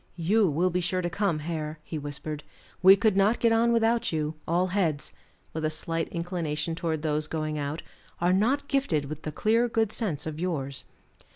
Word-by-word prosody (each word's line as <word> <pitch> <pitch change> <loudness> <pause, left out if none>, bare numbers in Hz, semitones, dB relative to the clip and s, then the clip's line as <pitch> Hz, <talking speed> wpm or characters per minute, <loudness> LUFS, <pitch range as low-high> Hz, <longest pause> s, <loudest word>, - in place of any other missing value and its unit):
"You 195 +4 +3
will 175 +5 +1
be 180 - +1
sure 180 +1 -1
to 175 - -1
come, 200 -5 +1
Hare," 155 -2 -3
he 155 0 -5
whispered. 145 +1 -5 0.4
"We 190 +2 +9
could 210 0 +2
not 200 +4 +3
get 230 - +3
on 230 +1 +4
without 230 0 +2
you; 155 -1 -1
all 180 +3 +2
heads," 160 -8 0 0.4
with 160 - -3
a 155 - +2
slight 165 +1 -2
inclination 170 -2 -2
towards 160 -2 -2
those 155 -1 0
going 155 -1 -2
out, 145 +3 -3 0.4
"are 175 +1 +3
not 255 +9 +2
gifted 265 - +1
with 155 +2 -6
the 155 - -4
clear 230 +8 +2
good 225 -2 +1
sense 180 - -2
of 155 -1 -5
yours." 140 -7 -3
170 Hz, 190 wpm, -27 LUFS, 155-200 Hz, 0.4 s, We